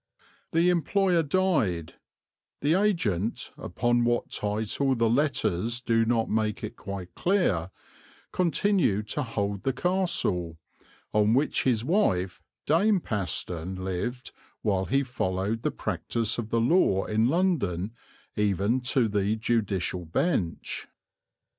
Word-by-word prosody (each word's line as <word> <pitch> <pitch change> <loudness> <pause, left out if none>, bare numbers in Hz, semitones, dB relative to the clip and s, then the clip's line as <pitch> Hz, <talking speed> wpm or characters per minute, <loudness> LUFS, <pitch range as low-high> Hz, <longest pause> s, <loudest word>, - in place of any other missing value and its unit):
The 170 +2 +3
employer 180 +1 +2
died; 145 - 0 0.7
the 145 +3 +3
agent, 145 - 0
upon 120 +6 0
what 120 0 0
title 110 +6 0
the 115 -1 +2
letters 115 - +1
do 115 -2 +2
not 115 -1 +2
make 110 0 -1
it 110 +2 -5
quite 100 -4 -7
clear, 140 - +1 0.6
continued 175 - +1
to 150 - -1
hold 100 -5 -2
the 135 - 0
castle, 130 - 0 0.6
on 105 +2 +4
which 140 +4 +1
his 120 -3 +2
wife 95 - +1 0.2
Dame 195 +6 +3
Paston 95 - -2
lived 95 +7 -4 0.3
while 95 -3 +1
he 135 +5 +1
followed 110 -3 -2
the - - 0
practice 115 0 -2
of 110 -2 -4
the 115 - +1
law 115 - +3
in 110 +2 +2
London 120 - 0 0.4
even 105 +4 +1
to 125 -1 +2
the 105 0 0
judicial 100 -6 -1
bench. 85 - -1
115 Hz, 120 wpm, -27 LUFS, 100-145 Hz, 0.7 s, on